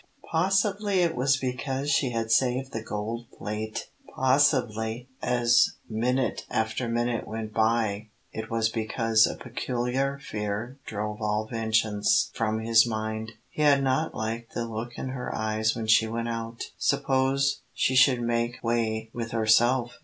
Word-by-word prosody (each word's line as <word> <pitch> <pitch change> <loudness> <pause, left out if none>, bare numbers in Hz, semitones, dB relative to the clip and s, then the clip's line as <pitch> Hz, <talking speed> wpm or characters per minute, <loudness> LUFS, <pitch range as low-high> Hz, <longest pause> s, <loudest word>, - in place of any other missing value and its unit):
Possibly 195 +3 +2
it 170 -2 +1
was 135 +2 +2
because 130 +2 -2
she 140 -2 +2
had 115 -1 -2
saved 130 +3 +2
the 115 - -4
gold 110 +2 -4
plate. 110 +1 -5 0.2
Possibly 125 -4 +1
as 120 -1 +3
minute 125 +4 0
after 110 +2 -1
minute 120 0 -1
went 110 -1 -5
by 110 -1 +1 0.2
it 110 +1 -5
was 115 -1 +1
because 110 0 +2
a - - -4
peculiar 130 +3 -2
fear 110 0 -4
drove 105 0 -4
all 105 0 0
vengeance 110 -2 +1
from 110 -1 -1
his 115 +1 +5
mind. 110 0 -3 0.2
He - - -4
had 140 -2 +5
not 135 +4 0
liked 115 +1 -4
the 120 - -1
look 115 +2 -6
in 130 - -4
her 130 -1 -4
eyes 110 0 0
when 115 -1 -3
she 110 0 +5
went 115 +1 -3
out. 115 0 -4 0.2
Suppose 135 +1 +1
she 130 +2 0
should 130 -1 +5
make 120 0 -1
way 110 -1 -1
with 115 -1 -4
herself? 120 +2 +2
115 Hz, 145 wpm, -27 LUFS, 110-130 Hz, 0.2 s, his